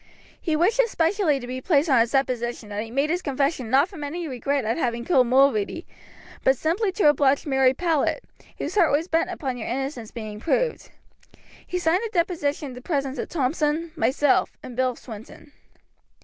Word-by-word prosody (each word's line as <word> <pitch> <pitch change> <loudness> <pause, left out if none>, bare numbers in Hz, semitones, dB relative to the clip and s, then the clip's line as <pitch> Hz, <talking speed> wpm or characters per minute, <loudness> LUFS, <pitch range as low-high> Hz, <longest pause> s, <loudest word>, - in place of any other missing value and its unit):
He 320 -3 0
wished 380 +10 +2
it - - +4
specially 330 -4 +1
to 245 - -8
be 255 +1 -5
placed 300 0 +2
on 265 -5 +4
his 230 0 +3
deposition 240 -4 -1
that 205 0 -3
he 225 - -9
made 275 +6 0
his 355 +1 0
confession 275 -4 -1
not 275 +6 +4
from 365 -7 -9
any 330 +4 -4
regret 275 0 -1
at 225 +2 0
having 235 -6 -2
killed 255 -8 +4
Mulready, 265 - +2 0.6
but 265 0 +4
simply 380 - 0
to 380 -5 +3
oblige 280 -2 +2
Mary 265 -2 +3
Powlett, 330 - 0 0.4
whose - - -4
heart 365 -6 +4
was 305 +4 +1
bent 330 +1 +1
upon 270 -8 -4
your 225 - -5
innocence 260 -3 -4
being 215 -3 -7
proved. 475 - -1 0.8
He 360 - -2
signed 350 +2 +2
the 455 - -3
deposition 310 -5 -1
in - - -9
the 250 - -10
presence 275 -3 -2
of - - -4
Thompson, 310 +2 -1
myself, 265 +2 +2
and 250 - -8
Bill 255 0 +1
Swinton." 225 +6 -11
280 Hz, 190 wpm, -24 LUFS, 250-330 Hz, 0.8 s, it